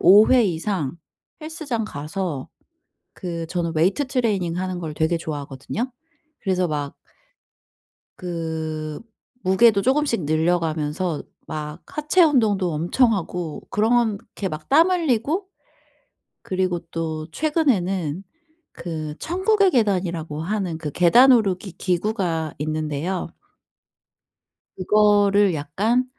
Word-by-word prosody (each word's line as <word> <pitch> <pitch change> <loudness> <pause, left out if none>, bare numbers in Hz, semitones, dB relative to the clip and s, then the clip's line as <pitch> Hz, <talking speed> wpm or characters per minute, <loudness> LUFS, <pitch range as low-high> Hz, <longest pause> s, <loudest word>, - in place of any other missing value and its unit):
5 205 +5 +8
회 255 -2 +6
이상 170 -5 -1 0.5
헬스장 295 -8 -3
가서 150 -3 -4 0.7
그 170 -2 -5
저는 170 -1 -2
웨이트 190 - +2
트레이닝 205 -10 0
하는 185 -1 -3
걸 160 -3 -5
되게 160 +2 +1
좋아하거든요. 150 - -4 0.5
그래서 185 -3 0
막 145 -2 -3 1.2
그 160 -3 -4 0.4
무게도 200 +2 +5
쪼금씩 260 - +1
늘려가면서 160 0 0 0.3
막 150 +1 -6
하체 305 +4 +2
운동도 215 - +2
엄청 200 +10 +2
하고 175 -5 -4
그렇게 215 -2 0
막 155 -2 -7
땀 325 +6 +6
흘리고 325 - 0 1.0
그리고 185 -2 -1
또 160 -1 -3
최근에는 195 - 0 0.5
그 155 -3 -5
천국의 385 +2 +2
계단이라고 175 - 0
하는 185 -2 -2
그 155 -2 -5
계단 235 - +6
오르기 195 -5 +2
기구가 175 -4 -1
있는데요. 155 +4 -2 1.5
그거를 205 0 +4
약간 195 - 0
185 Hz, 230 characters per minute, -23 LUFS, 160-225 Hz, 1.5 s, 5